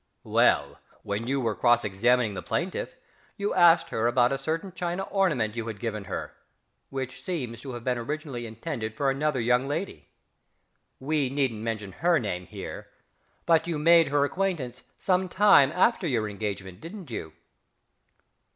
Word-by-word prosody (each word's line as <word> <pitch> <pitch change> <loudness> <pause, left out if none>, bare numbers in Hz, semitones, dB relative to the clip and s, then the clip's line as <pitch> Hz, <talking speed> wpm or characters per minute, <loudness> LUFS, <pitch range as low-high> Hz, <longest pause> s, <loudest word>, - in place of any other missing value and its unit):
Well, - - +2 0.2
when 105 +3 -3
you 135 +1 0
were 115 -4 0
cross 120 +1 +3
examining 110 +3 +2
the 90 - -5
plaintiff - - -3 0.4
you 205 +1 -1
asked 170 -2 +5
her 115 +1 0
about 120 +1 +3
a 135 - 0
certain 165 +6 -3
china 175 +1 -2
ornament 150 - 0
you 115 -1 -4
had 110 -3 -6
given 105 -3 -4
her, - - -5 0.6
which 135 -1 -5
seems 125 - -4
to 135 -2 -7
have 120 -1 -7
been 125 -1 0
originally 140 -2 -4
intended 110 -1 -5
for 140 -2 +2
another 140 0 0
young 125 +3 +2
lady. 165 +7 -4 0.9
We 145 -1 0
needn't 130 -5 -1
mention 110 -3 -4
her 170 - +2
name 90 - -3
here - - -8 0.6
but 165 0 +3
you 165 -3 -1
made 165 +1 +6
her 140 +1 +2
acquaintance 150 -8 -2 0.2
some 185 -1 +1
time 185 -9 +6
after 190 +1 +2
your 115 -7 0
engagement, 100 -3 -5
didn't 170 - -9
you?... 80 -8 -5
130 Hz, 160 wpm, -27 LUFS, 115-165 Hz, 0.9 s, made